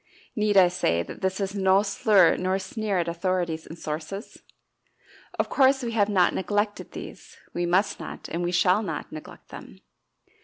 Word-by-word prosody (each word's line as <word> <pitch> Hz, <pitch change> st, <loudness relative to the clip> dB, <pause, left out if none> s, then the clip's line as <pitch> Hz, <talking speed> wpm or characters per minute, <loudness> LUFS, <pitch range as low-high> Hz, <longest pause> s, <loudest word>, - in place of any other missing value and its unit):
Need 210 Hz, -2 st, +1 dB
I 185 Hz, -2 st, +8 dB
say 175 Hz, -, 0 dB
that -, -, -10 dB
this 190 Hz, +1 st, -1 dB
is 195 Hz, -1 st, -2 dB
no 195 Hz, 0 st, +3 dB
slur 200 Hz, -3 st, +4 dB
nor 185 Hz, +1 st, 0 dB
sneer 200 Hz, +1 st, -3 dB
at 170 Hz, -1 st, 0 dB
authorities 170 Hz, -1 st, -2 dB
and 165 Hz, -, -9 dB
sources? 160 Hz, +7 st, -6 dB, 1.0 s
Of -, -, +1 dB
course 265 Hz, -1 st, +3 dB
we 235 Hz, -, -2 dB
have 215 Hz, -2 st, +2 dB
not 185 Hz, -4 st, +3 dB
neglected 205 Hz, +2 st, -2 dB
these -, -, -10 dB, 0.2 s
we 175 Hz, 0 st, -1 dB
must 185 Hz, +4 st, +1 dB
not, -, -, -8 dB
and 170 Hz, -, -4 dB
we 175 Hz, 0 st, -1 dB
shall 180 Hz, +3 st, +3 dB
not, 210 Hz, -, -5 dB
neglect 155 Hz, 0 st, -11 dB
them. 65 Hz, -, -11 dB
190 Hz, 170 wpm, -25 LUFS, 175-205 Hz, 1.0 s, I